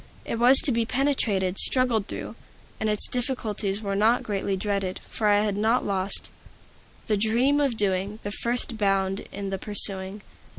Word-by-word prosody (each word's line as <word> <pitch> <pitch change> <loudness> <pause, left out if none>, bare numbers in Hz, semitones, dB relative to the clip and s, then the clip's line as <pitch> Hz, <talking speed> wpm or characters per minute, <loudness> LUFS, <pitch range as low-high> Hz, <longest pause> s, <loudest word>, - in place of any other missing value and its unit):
It 230 - -4
was 250 +3 +7
to 295 - +3
be 230 -1 +1
penetrated, 225 -8 0
struggled 245 -5 +1
through; - - -7 0.4
and 220 - -1
its 210 -1 -1
difficulties 220 -5 -3
were 200 -2 -3
not 220 +4 +2
greatly 195 -1 -2
dreaded, 195 -2 -2
for 215 - -2
I 205 0 +3
had 205 -2 -1
not 220 +4 +1
lost 195 0 -1 0.7
"The 210 - 0
dream 240 +7 +2
of 270 -5 0
Doing, 200 0 -1
The 205 - -4
first 235 +1 -2
bound 195 -1 0
in 200 -1 -5
the 195 - -3
pursuing." 195 0 +2
210 Hz, 165 wpm, -25 LUFS, 195-235 Hz, 0.7 s, was